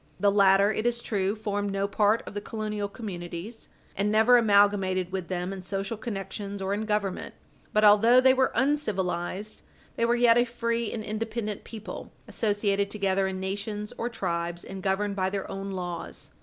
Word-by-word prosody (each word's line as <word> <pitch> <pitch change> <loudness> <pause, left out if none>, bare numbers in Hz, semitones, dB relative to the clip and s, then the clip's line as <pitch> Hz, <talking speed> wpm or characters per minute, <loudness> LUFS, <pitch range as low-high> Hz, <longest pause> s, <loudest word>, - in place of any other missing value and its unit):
The 200 +1 +4
latter, 200 0 +5
it 215 +2 -1
is 240 0 0
true, 200 -3 -1
formed 205 -2 -2
no 195 0 0
part 210 +2 +2
of - - -8
the 205 - -4
colonial 210 -2 -3
communities, 195 0 -7 0.3
and 205 +2 0
never 220 +3 +6
amalgamated 200 -4 +3
with 185 -2 -3
them 180 +1 -3
in 190 - -7
social 195 +4 -3
connections 200 -2 -5
or 195 +1 -1
in 215 +2 -2
government. 210 -3 -2 0.4
But 215 0 +3
although 220 +4 +7
they 260 0 +6
were 260 0 +2
uncivilized, 210 -7 -1 0.4
they 230 - +2
were 235 +1 +3
yet 240 -1 +5
a 240 - +4
free 235 -1 -2
and 220 - -4
independent 215 0 -4
people, 220 -2 -8 0.2
associated 205 -2 0
together 195 -2 0
in 190 0 -4
nations 205 +2 -4
or 235 - -2
tribes 170 -5 -3
and 195 0 -8
governed 200 +1 0
by 190 -1 0
their 195 0 -3
own 195 0 -5
laws. 180 -3 -6
205 Hz, 175 wpm, -27 LUFS, 195-220 Hz, 0.4 s, although